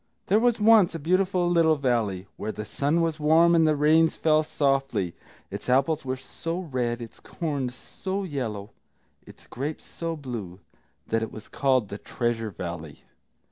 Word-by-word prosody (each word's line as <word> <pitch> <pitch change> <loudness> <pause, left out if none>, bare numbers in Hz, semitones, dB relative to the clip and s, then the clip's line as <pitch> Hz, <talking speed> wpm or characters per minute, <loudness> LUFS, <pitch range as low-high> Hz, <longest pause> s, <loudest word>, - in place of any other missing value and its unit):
] - - -48
There 205 +3 +5
was 240 -1 +2
once 210 -5 +5
a - - -1
beautiful 185 +3 +1
little 165 -2 +4
valley, 115 -9 0
where 110 - -4
the 105 - -6
sun 145 +9 0
was 165 -1 -1
warm, 160 +3 +5
and 165 -1 +5
the 155 - +3
rains 155 +2 +4
fell 155 -1 +3
softly; 135 - 0 0.4
its - - -6
apples 140 +5 +2
were 130 0 -3
so 165 +6 -5
red, 125 -7 -2
its 115 - -12
corn 145 -6 -3
so 190 +10 -5
yellow, 115 - -4 0.6
its - - -15
grapes 145 +5 -5
so 165 -1 -4
blue, 115 - -7 0.5
that 115 0 0
it 115 - -3
was 110 - -10
called 130 -6 +1
the 100 - -6
Treasure 120 -2 -2
Valley. 85 -5 -7
140 Hz, 170 wpm, -26 LUFS, 115-165 Hz, 0.6 s, There